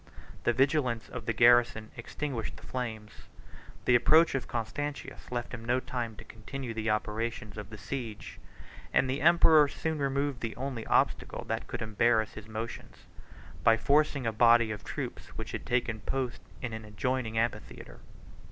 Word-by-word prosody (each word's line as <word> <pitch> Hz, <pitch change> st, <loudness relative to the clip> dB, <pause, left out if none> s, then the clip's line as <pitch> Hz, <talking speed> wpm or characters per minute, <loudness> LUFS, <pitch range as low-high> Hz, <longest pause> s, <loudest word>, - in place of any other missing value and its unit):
The -, -, +5 dB
vigilance 130 Hz, -3 st, +1 dB
of -, -, -7 dB
the -, -, +2 dB
garrison 120 Hz, -1 st, +4 dB
extinguished 125 Hz, 0 st, -4 dB
the -, -, -13 dB
flames; 110 Hz, -4 st, -6 dB, 0.6 s
the 125 Hz, -, +4 dB
approach 160 Hz, +7 st, +6 dB
of 135 Hz, -2 st, -2 dB
Constantius 125 Hz, +6 st, -4 dB
left 120 Hz, 0 st, -3 dB
him 115 Hz, -2 st, -6 dB
no 120 Hz, +2 st, +1 dB
time 125 Hz, -3 st, -4 dB
to -, -, -11 dB
continue 120 Hz, +3 st, -7 dB
the 110 Hz, 0 st, -2 dB
operations 105 Hz, 0 st, -2 dB
of 105 Hz, -1 st, -7 dB
the 110 Hz, -, -9 dB
siege; 110 Hz, 0 st, -6 dB, 0.5 s
and 130 Hz, -, +3 dB
the 130 Hz, +2 st, -2 dB
emperor 160 Hz, -2 st, +6 dB
soon 160 Hz, +2 st, -3 dB
removed 140 Hz, -1 st, 0 dB
the 115 Hz, -1 st, -3 dB
only 125 Hz, -3 st, -4 dB
obstacle -, -, +1 dB
that -, -, -2 dB
could -, -, -4 dB
embarrass 110 Hz, 0 st, +2 dB
his 110 Hz, 0 st, -10 dB
motions, 110 Hz, +1 st, -7 dB, 0.6 s
by 115 Hz, 0 st, +6 dB
forcing 140 Hz, +1 st, +2 dB
a 115 Hz, -, 0 dB
body 115 Hz, 0 st, +5 dB
of 105 Hz, -, -6 dB
troops -, -, -5 dB
which -, -, -5 dB
had -, -, -5 dB
taken 120 Hz, -3 st, 0 dB
post 130 Hz, +2 st, -3 dB, 0.2 s
in 120 Hz, -2 st, -3 dB
an 110 Hz, 0 st, -6 dB
adjoining 115 Hz, +2 st, -2 dB
amphitheatre. 115 Hz, +1 st, -3 dB
120 Hz, 160 wpm, -30 LUFS, 110-135 Hz, 0.6 s, approach